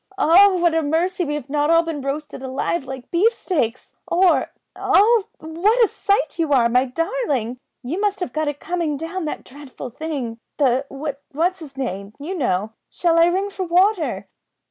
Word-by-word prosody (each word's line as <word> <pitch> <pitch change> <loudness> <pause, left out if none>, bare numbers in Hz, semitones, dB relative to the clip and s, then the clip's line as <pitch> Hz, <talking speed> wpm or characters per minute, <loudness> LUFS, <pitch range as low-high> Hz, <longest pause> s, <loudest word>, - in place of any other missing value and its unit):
"Oh! 385 +2 +6
what 345 -2 +2
a 325 - +2
mercy 340 +4 0
we've 295 -3 -4
not 295 +1 0
all 330 0 +5
been 325 -3 -4
roasted 275 +1 -4
alive 270 +4 -2
like 260 -2 -8
beef 390 +7 +4
steaks 280 - -2 0.2
or 360 +1 +3 0.3
oh! 435 +1 +4
what 390 +10 +2
a - - -2
sight 395 -8 -1
you 320 -3 0
are, 240 -3 +5
my 250 +2 +3
darling! 270 - -2 0.2
You 320 +11 -3
must 410 -2 0
have 360 - -4
got 310 0 -1
it 290 -1 -3
coming 335 -4 -2
down 330 +3 -4
that 300 - -4
dreadful 265 -2 -10
thing 265 -5 -5 0.2
the 270 -1 +2 0.4
what's 345 +5 -1
'is 280 -4 -11
name, 200 -6 -4
you 310 +7 -5
know. 220 - -1 0.2
Shall 335 -1 +2
I 335 - +6
ring 385 +3 0
for 380 - -4
water?" 365 0 +1
320 Hz, 175 wpm, -21 LUFS, 270-360 Hz, 0.4 s, Oh